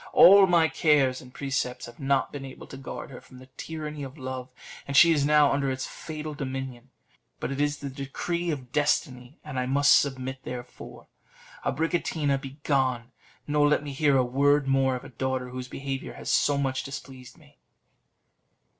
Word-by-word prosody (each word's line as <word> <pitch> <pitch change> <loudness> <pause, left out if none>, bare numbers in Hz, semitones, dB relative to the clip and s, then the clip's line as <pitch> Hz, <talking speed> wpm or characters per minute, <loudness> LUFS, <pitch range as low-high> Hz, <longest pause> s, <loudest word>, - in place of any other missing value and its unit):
All 200 -6 +9
my 170 -3 +4
cares 145 -6 +2
and 125 - -14
precepts 130 -2 -3
have 120 - -13
not 135 -1 +1
been 145 -1 -7
able 135 -1 -9
to - - -11
guard 135 0 -8
her 125 - -10
from 130 - -16
the 130 - -13
tyranny 150 -2 -6
of 135 +2 -7
love, 130 -1 -6 0.4
and 140 0 0
she 170 - +8
is 150 -3 +2
now 150 -2 +5
under 140 -1 0
its 130 0 -3
fatal 155 -1 -7
dominion. 135 -3 -6 0.5
But - - -3
it 135 +1 -2
is 145 0 0
the 140 - -6
decree 170 +6 -3
of 130 -6 -4
destiny, 130 -2 -1
and 140 -4 -4
I 125 - -1
must 140 +2 +5
submit; 130 -1 -3
therefore, 125 -1 -9 0.6
Abricotina, 150 -2 0
begone! 135 -3 -1 0.3
nor 145 0 +3
let 150 - +2
me 145 -2 -6
hear 140 -1 +3
a 130 - +3
word 140 +3 +2
more 135 -1 +2
of 125 - -7
a - - -10
daughter 130 0 -3
whose 125 0 -6
behaviour 135 +1 -5
has - - -5
so 145 -1 +3
much 135 -2 -1
displeased 130 -1 -9
me." 150 -3 -22
135 Hz, 180 wpm, -27 LUFS, 130-145 Hz, 0.6 s, All